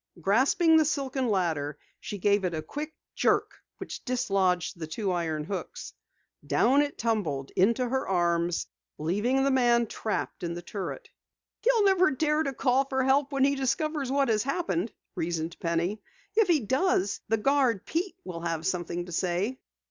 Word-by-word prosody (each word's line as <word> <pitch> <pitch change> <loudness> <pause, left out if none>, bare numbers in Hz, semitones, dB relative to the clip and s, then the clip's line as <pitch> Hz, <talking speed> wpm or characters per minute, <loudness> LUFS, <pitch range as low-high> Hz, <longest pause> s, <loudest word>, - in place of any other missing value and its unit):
Grasping 275 - +4
the 315 - +5
silken 270 -3 -1
ladder, 160 -7 0 0.2
she 205 - -6
gave 200 +1 +2
it 175 -2 -1
a 155 - -4
quick 300 +2 -5 0.2
jerk - - +1 0.2
which - - -7
dislodged 195 - 0
the 160 - -4
two 190 +5 -2
iron 160 -4 -1
hooks. 200 - -6 0.5
Down 270 +4 +3
it 290 -1 -2
tumbled 170 - -1
into 235 +7 +2
her 260 +2 -1
arms, 170 -2 +1 0.3
leaving 210 - +1
the 275 - +2
man 240 -2 +4
trapped 215 0 -3
in 170 -1 -3
the 175 - -7
turret. 195 +1 -6 0.5
"He'll 465 -2 +3
never 375 -2 +5
dare 300 +2 +1
call 265 +1 +2
for 265 -1 0
help 270 +2 +2
when 275 -1 +1
he 280 +1 +4
discovers 280 +1 -1
what 275 -2 +2
has 215 -2 +2
happened," 240 - -1 0.2
reasoned 165 0 -3
Penny. 170 +5 -1 0.3
"If 440 -2 +4
he 330 -5 +3
does, 240 - +1
the 225 - +2
guard, 255 -3 +2
Pete, 350 +4 -2
will 175 -2 -6
have 165 -1 -2
something 175 -1 -2
to 175 - -10
say!" 185 +9 -1
225 Hz, 165 wpm, -28 LUFS, 175-275 Hz, 0.5 s, the